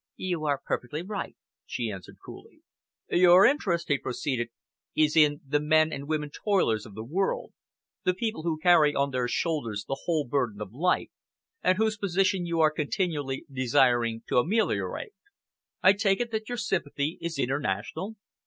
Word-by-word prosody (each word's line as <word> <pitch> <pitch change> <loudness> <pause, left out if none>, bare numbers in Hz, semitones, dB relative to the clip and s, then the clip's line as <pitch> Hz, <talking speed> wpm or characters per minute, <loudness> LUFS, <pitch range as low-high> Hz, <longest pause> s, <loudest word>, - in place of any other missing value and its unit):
"You 175 -4 -2
are 140 -2 +1
perfectly 150 +6 -3
right," 200 +1 -5 0.3
she 115 -3 -3
answered 95 -3 -10
coolly. - - -13 0.5
"Your 180 +1 +7
interest," 180 - +1
he 145 -3 +1
proceeded, 125 -2 -2 0.5
"is 155 0 +3
in 150 -1 +4
the 145 +2 +2
men 155 +1 +3
and 140 0 -6
women 150 -1 -2
toilers 145 - 0
of 100 - -14
the 110 - -6
world, 180 +11 -2 0.5
the 180 - +1
people 220 -2 -2
who 165 -1 -1
carry 155 -3 +5
on 140 0 +1
their 125 -2 0
shoulders 120 -7 -2
the 135 - -4
whole 160 -4 +1
burden 120 -5 -1
of 105 -1 -7
life, 175 +8 0 0.5
and 185 - +3
whose 220 0 +1
position 190 -2 +1
you 170 -1 -1
are 155 -1 +5
continually 150 -3 -2
desiring 120 -3 +2
to - - +3
ameliorate. 220 - -1 0.7
I 190 - +8
take 200 -1 +1
it 240 -1 -2
that 220 0 -3
your 245 - -3
sympathy 160 -7 -2
is 170 -1 -4
international?" 135 - -2
155 Hz, 160 wpm, -27 LUFS, 130-185 Hz, 0.7 s, I